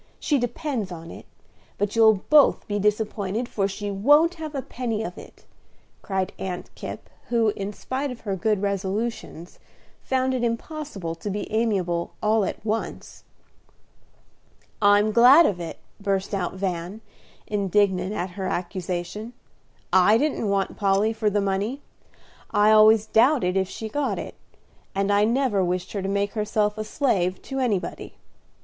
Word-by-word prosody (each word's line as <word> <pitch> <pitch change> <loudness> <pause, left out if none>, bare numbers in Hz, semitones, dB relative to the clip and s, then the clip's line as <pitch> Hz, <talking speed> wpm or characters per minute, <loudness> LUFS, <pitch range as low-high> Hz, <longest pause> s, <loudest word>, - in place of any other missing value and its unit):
She 290 -3 +1
depends 245 - -3
on 165 -1 -8
it; - - -11 0.5
but 205 +1 -1
you'll 220 -3 +5
both 300 -2 +5
be 205 0 -1
disappointed, 210 +1 -1
for 195 -5 -1
she 205 +1 -5
won't 290 - +4
have 310 -2 -5
a 270 - -3
penny 230 -4 -3
of 180 -4 -6
it," - - -14 0.6
cried 190 -1 -2
Aunt 180 -2 -5
Kipp, - - -8 0.2
who, 230 -2 +2
in 200 -1 -4
spite 265 +6 -4
of 250 -2 -8
her 200 -3 -2
good 210 +1 0
resolutions, 200 -2 -3 0.4
found 260 0 0
it 250 -2 -1
impossible 230 - -4
to 165 +5 -6
be 205 +1 -4
amiable 190 -7 0
all 215 0 +2
at 200 - -6
once. 225 +1 -4 1.6
"I'm 205 +1 +5
glad 255 +9 +7
of 190 -8 0
it!" 170 -1 -6 0.2
burst 195 -1 -1
out 185 -2 -2
Van, 185 +2 -4 0.4
indignant 200 -1 +1
at 185 -3 -3
her 190 +1 -4
accusation. 180 +4 -4 0.6
"I 190 +4 +6
didn't 275 -6 0
want 195 -1 -1
Polly 200 +2 +2
for 220 -1 0
the 205 0 0
money; 200 +7 -1 0.7
I 210 +1 +4
always 215 0 +6
doubted 225 -5 +3
if 190 -1 +1
she 220 - -6
got 285 +5 -1
it; - - -6 0.6
and 195 +1 +1
I 205 +1 +4
never 235 -4 +1
wished 180 0 -2
her 200 - -3
to 190 - -3
make 200 0 -1
herself 210 -1 0
a - - -1
slave 195 -7 0
to 270 0 -4
anybody. 215 -8 -2
210 Hz, 155 wpm, -24 LUFS, 190-230 Hz, 1.6 s, glad